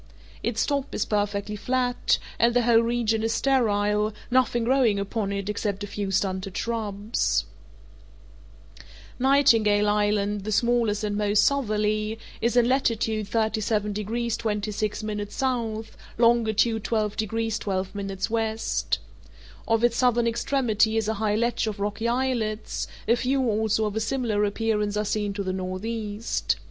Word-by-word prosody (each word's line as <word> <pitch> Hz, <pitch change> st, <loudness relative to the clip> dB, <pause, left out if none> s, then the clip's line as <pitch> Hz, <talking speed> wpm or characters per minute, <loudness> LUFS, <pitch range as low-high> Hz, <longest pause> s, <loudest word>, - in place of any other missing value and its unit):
Its 225 Hz, -2 st, 0 dB
top 280 Hz, -1 st, -2 dB
is -, -, 0 dB
perfectly 205 Hz, 0 st, -1 dB
flat, 250 Hz, +3 st, +1 dB, 0.2 s
and 235 Hz, +1 st, +3 dB
the 245 Hz, -, +4 dB
whole 230 Hz, -1 st, +5 dB
region 230 Hz, -1 st, +1 dB
is 225 Hz, 0 st, 0 dB
sterile, 210 Hz, -5 st, +2 dB, 0.2 s
nothing 245 Hz, -2 st, +2 dB
growing 245 Hz, -4 st, +3 dB
upon 200 Hz, 0 st, -2 dB
it 200 Hz, 0 st, -3 dB
except 205 Hz, -1 st, -2 dB
a -, -, -2 dB
few 205 Hz, -1 st, -4 dB
stunted 190 Hz, 0 st, -1 dB
shrubs. 215 Hz, -2 st, -1 dB, 1.7 s
Nightingale 225 Hz, -6 st, +4 dB
Island, 205 Hz, -1 st, +1 dB
the 215 Hz, -, -3 dB
smallest 230 Hz, -1 st, +1 dB
and 205 Hz, -1 st, -1 dB
most 205 Hz, 0 st, +3 dB
southerly, 215 Hz, -4 st, 0 dB, 0.2 s
is 235 Hz, +2 st, +1 dB
in 240 Hz, -1 st, +5 dB
latitude 225 Hz, -5 st, +1 dB
37 215 Hz, -1 st, 0 dB
degrees 225 Hz, +3 st, -2 dB
26' 210 Hz, 0 st, -2 dB
S., 210 Hz, +3 st, -4 dB, 0.7 s
longitude 230 Hz, -1 st, +3 dB
12 215 Hz, -3 st, -1 dB
degrees 225 Hz, 0 st, -1 dB
12' 190 Hz, -1 st, -2 dB
W. 200 Hz, +3 st, -1 dB, 1.2 s
Off 225 Hz, 0 st, +2 dB
its 240 Hz, -1 st, +3 dB
southern 240 Hz, -2 st, +3 dB
extremity 230 Hz, -2 st, +1 dB
is 220 Hz, -1 st, 0 dB
a 220 Hz, -, +1 dB
high 210 Hz, -1 st, +1 dB
ledge 235 Hz, 0 st, 0 dB
of 210 Hz, -1 st, -4 dB
rocky 205 Hz, +3 st, -2 dB
islets; 235 Hz, -3 st, -1 dB, 0.2 s
a 230 Hz, -, +5 dB
few 260 Hz, +2 st, 0 dB
also 220 Hz, 0 st, +1 dB
of 210 Hz, -1 st, -3 dB
a -, -, +1 dB
similar 220 Hz, -3 st, 0 dB
appearance 210 Hz, 0 st, -1 dB
are 210 Hz, -, 0 dB
seen 210 Hz, -1 st, -1 dB
to 200 Hz, 0 st, -3 dB
the 185 Hz, -1 st, -2 dB
northeast. 205 Hz, +4 st, -2 dB
220 Hz, 140 wpm, -25 LUFS, 205-235 Hz, 1.7 s, whole